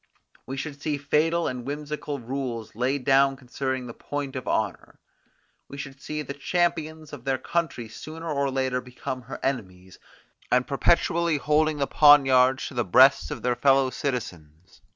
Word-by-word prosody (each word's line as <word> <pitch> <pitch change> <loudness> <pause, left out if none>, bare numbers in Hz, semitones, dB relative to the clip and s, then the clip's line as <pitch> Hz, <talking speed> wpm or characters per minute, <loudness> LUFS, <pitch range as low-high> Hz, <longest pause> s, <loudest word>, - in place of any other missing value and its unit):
We 135 - -5
should 145 0 -6
see 150 -1 -1
fatal 160 +4 +1
and 125 -1 -4
whimsical 150 +1 -4
rules 125 -3 -5
laid 125 +3 -1
down 135 0 +4
concerning 130 0 -4
the 120 - -8
point 145 0 -5
of 130 - -5
honour. 105 -5 -2 0.7
We 140 - -10
should 135 0 -8
see 150 +1 -4
the 140 - -6
champions 160 0 -1
of 135 -5 -8
their 135 0 0
country 165 -9 -2
sooner 160 +8 -9
or 140 -3 0
later 130 -1 -1
become 130 +1 -6
her 125 +2 -8
enemies, 95 -8 -4 0.5
and 125 0 +3
perpetually 170 +2 +2
holding 150 +1 +1
their 140 - +1
poniards 135 -3 +5
to - - -12
the 120 -2 0
breasts 130 +8 +5
of - - -6
their 125 -1 +1
fellow 135 +1 +3
citizens. 90 - -6
135 Hz, 160 wpm, -25 LUFS, 125-150 Hz, 0.7 s, poniards